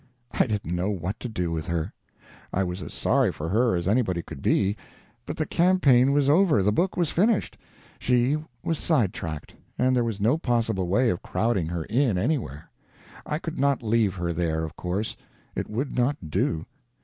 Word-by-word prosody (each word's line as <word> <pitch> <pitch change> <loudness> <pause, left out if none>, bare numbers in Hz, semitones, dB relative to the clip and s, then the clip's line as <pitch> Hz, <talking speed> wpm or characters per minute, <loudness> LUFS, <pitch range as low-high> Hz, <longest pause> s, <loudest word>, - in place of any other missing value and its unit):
I - - +2
didn't 100 -6 -2
know 90 +3 0
what 95 +1 -3
to 125 - -5
do 90 -6 -2
with 80 0 -3
her. 85 -2 -2 0.6
I 95 - +1
was 90 0 -4
as - - -7
sorry - - +2
for 80 +2 -5
her 115 +2 +2
as 85 0 -2
anybody 95 -6 +1
could 70 - -9
be, 100 +1 +2 0.5
but 150 - -4
the 155 - 0
campaign 145 -9 +4
was 140 -1 +2
over, 150 - +4
the 105 - +3
book 180 - 0
was 170 -4 +1
finished, 210 +4 +1 0.4
she 125 +3 +2 0.3
was 165 -2 -1
sidetracked, 95 - -1 0.2
and 130 +1 +3
there 120 - +3
was 115 -3 -3
no 115 +10 +2
possible 115 - 0
way 120 +7 +3
of 90 - -3
crowding 105 -8 0
her 85 -1 -3
in, 115 - +1
anywhere. 100 - -2 0.6
I 150 - -1
could 165 -2 -6
not 140 -2 +2
leave 110 -3 +2
her 85 -1 -2
there, 80 -1 -1
of 80 +1 -6
course; 95 +5 -3 0.4
it - - -4
would 125 +7 -3
not 125 - 0
do. 80 +2 0
110 Hz, 185 wpm, -26 LUFS, 90-135 Hz, 0.6 s, campaign